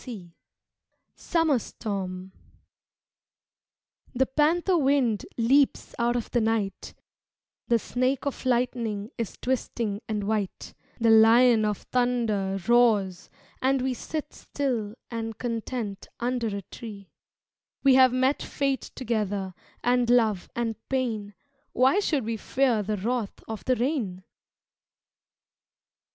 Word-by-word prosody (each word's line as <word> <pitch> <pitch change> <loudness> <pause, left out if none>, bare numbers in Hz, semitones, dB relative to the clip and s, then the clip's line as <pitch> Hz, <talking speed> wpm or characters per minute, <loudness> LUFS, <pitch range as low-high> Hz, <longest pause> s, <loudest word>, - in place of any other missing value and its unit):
XI 195 -9 -9 0.8
Summer 325 -6 +1
Storm 190 -4 -5 1.8
The 265 +2 +3
panther 325 +7 +2
wind 270 -8 +2
Leaps 265 +4 +2
out 240 +1 +2
of 240 - -3
the 240 - +2
night, 220 -4 -1 0.7
The 235 - +4
snake 255 +4 -1
of 280 - -3
lightning 235 -4 -1
Is 230 - -4
twisting 230 -4 -2
and 210 -2 -1
white, 205 -2 -3 0.3
The 230 -1 +4
lion 225 +1 +6
of 210 -2 -2
thunder 230 -6 +1
Roars 210 -6 +3 0.3
and 265 0 +2
we 260 0 0
Sit 300 +5 -5
still 235 -7 -3 0.2
and 225 -2 -4
content 230 -3 -4
Under 240 -1 -1
a 200 -2 -4
tree 200 -1 -10 0.7
We 275 -1 +6
have 260 -1 +7
met 260 +3 +1
fate 275 -1 -2
together 205 -6 -2 0.3
And 245 -1 +2
love 220 -6 +3
and 230 -2 -2
pain, 225 -6 -2 0.4
Why 265 +10 +4
should 295 - 0
we 225 0 -2
fear 245 -1 +1
The 210 +1 -2
wrath 225 +1 -3
of 220 -1 -6
the 255 - +3
rain! 235 - -2
235 Hz, 115 wpm, -26 LUFS, 210-255 Hz, 1.8 s, have